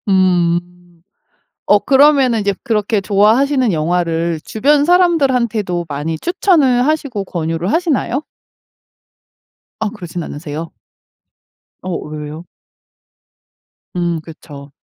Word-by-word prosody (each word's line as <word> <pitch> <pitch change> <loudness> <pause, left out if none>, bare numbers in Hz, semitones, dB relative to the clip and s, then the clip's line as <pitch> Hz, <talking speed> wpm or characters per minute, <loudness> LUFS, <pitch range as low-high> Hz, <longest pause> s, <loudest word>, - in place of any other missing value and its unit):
음. 180 -3 +3 1.1
어 205 - +5
그러면은 270 -4 +4
이제 200 -1 0
그렇게 220 -3 0
좋아하시는 225 +5 +2
영화를 165 0 -1
주변 285 +6 +2
사람들한테도 255 - +1
많이 150 +3 -3
추천을 300 -9 +2
하시고 280 -10 -1
권유를 165 +1 -3
하시나요? 310 -5 0 1.6
아 220 -1 -1
그러진 175 -5 -7
않으세요? 150 +2 -7 1.1
어 185 -2 -3
왜요? 150 +2 -7 1.5
음 170 -2 -1
그쵸. 145 -3 -12
200 Hz, 225 characters per minute, -16 LUFS, 165-265 Hz, 1.6 s, 어